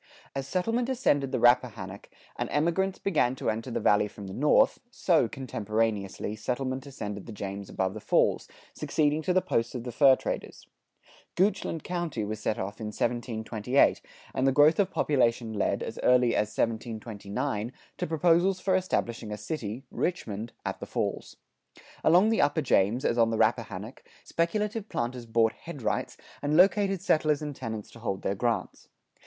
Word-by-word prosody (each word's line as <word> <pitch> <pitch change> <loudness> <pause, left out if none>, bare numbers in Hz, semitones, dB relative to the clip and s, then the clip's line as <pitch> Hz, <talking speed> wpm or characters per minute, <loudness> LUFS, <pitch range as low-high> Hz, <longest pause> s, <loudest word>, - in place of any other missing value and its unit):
As 135 -1 -4
settlement 225 - 0
ascended 145 - +1
the 130 - 0
Rappahannock, 115 -5 +2 0.3
and - - -3
emigrants 170 +5 +1
began 145 -10 +1
to - - -1
enter 115 +4 -5
the 120 - -2
Valley 105 0 +3
from 105 -1 -10
the 95 - -7
north, 150 - +3
so, 170 - +2
contemporaneously, 110 -5 -2
settlement 130 +4 -3
ascended 105 -7 -6
the - - -7
James 100 -1 -6
above 95 0 -1
the 110 - -6
falls, - - +2 0.3
succeeding 150 0 0
to 180 - 0
the 185 0 +3
posts 115 +2 -1
of 120 - -4
the 125 - -5
fur 135 +2 +6
traders.[93:2] - - -9
Goochland 185 -4 0
County 170 -11 -3
was 105 +1 -4
set 105 - -1
off 100 +2 -5
in 110 - -3
1728, 115 +2 +1 0.3
and 130 - +1
the - - +5
growth 150 +5 +5
of 195 -2 +3
population 120 -9 +1
led, 105 - 0
as - - -6
early 125 -1 +4
as 105 - +2
1729, 110 +1 -3 0.3
to - - -1
proposals 175 +4 +3
for 185 0 +1
establishing 120 -12 -1
a 105 - -4
city 110 +1 -5
(Richmond) 115 - -3
at - - -3
the - - -7
falls. - - -3 0.7
Along 180 +6 +5
the 225 - +2
upper 145 +2 +2
James, 115 0 +2
as 120 - +1
on 115 -1 +5
the 115 - -1
Rappahannock, - - -1 0.2
speculative 210 +5 -1
planters 120 0 -3
bought 115 0 +2
headrights 140 -10 -4 0.2
and 145 +2 +1
located 195 0 +4
settlers 155 -1 +2
and 145 -2 -5
tenants 110 -4 -6
to 115 - -13
hold 100 -5 -3
their 95 - 0
grants. 115 +3 -2
125 Hz, 165 wpm, -28 LUFS, 110-160 Hz, 0.7 s, fur